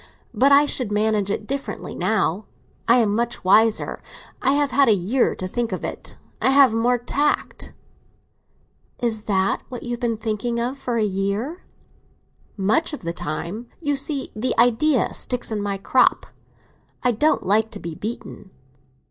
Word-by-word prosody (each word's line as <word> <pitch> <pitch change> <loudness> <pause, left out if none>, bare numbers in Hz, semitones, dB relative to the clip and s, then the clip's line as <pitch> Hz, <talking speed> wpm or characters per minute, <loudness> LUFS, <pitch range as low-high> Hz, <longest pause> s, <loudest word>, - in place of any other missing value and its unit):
But 275 +2 +3
I 285 +1 +7
should 250 -6 -1
manage 210 -1 +1
it 210 +1 -2
differently 275 +3 -5
now. 210 -2 0 0.4
I 235 - +6
am 220 -4 +2
much 235 +1 -2
wiser; 215 +4 +3 0.4
I 270 - +3
have 285 -1 +1
had 280 0 +4
a 220 - +5
year 210 +8 +1
to 185 - -5
think 235 +4 -2
of - - -4
it. - - -6 0.2
I - - +4
have 270 -3 +6
more 240 +2 +2
tact." 280 +5 -1 1.3
"Is 220 -3 -1
that 195 -2 +1
what 250 -2 -7
you 240 - -5
have 240 - -3
been 235 -3 -1
thinking 225 +2 -2
of 245 +3 -2
for 250 -4 -3
a 220 - +2
year?" 205 - -2 1.0
"Much 220 +12 +1
of 295 - -6
the 170 0 -3
time. 170 +8 -5
You 290 -3 0
see, 275 0 -2
the 245 +4 -1
idea 245 +3 +3
sticks 250 -2 -3
in 210 -1 -2
my 200 -1 -2
crop. 250 +6 +2 0.8
I 250 - +3
don't 300 +8 +1
like 215 +3 +2
to 210 - -9
be 170 -3 -6
beaten." 210 +1 -7
230 Hz, 165 wpm, -22 LUFS, 210-260 Hz, 1.3 s, I